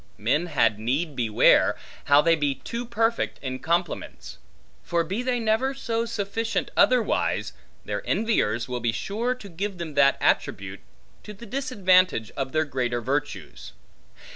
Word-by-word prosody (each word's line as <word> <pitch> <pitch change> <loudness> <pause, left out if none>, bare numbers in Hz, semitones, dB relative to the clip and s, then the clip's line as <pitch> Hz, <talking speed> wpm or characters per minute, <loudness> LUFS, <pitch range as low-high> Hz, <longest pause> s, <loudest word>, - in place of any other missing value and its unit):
Men 135 +11 0
had 110 -9 +2
need 140 +7 -1
beware, 115 -4 +4 0.3
how 145 +1 +6
they 165 0 +4
be 145 -3 0
too 235 - -6
perfect 230 0 0
in 130 -1 -4
compliments; 165 - -3 0.4
for 170 -1 0
be 190 +8 -3
they 250 -1 0
never 230 +5 +1
so 230 -3 -2
sufficient 225 +1 -2
otherwise, 250 -3 +2 0.3
their - - -3
enviers 120 - +1
will 125 -1 -3
be 120 -1 0
sure 225 - -2
to 245 -5 -11
give 195 +2 -4
them 165 -3 -6
that 140 -1 +4
attribute, 95 0 0 0.4
to 210 - -10
the 235 - -11
disadvantage 185 - +2
of 135 -1 -4
their 155 +2 +1
greater 125 -4 -2
virtues. 120 - -4
170 Hz, 145 wpm, -25 LUFS, -, 0.4 s, how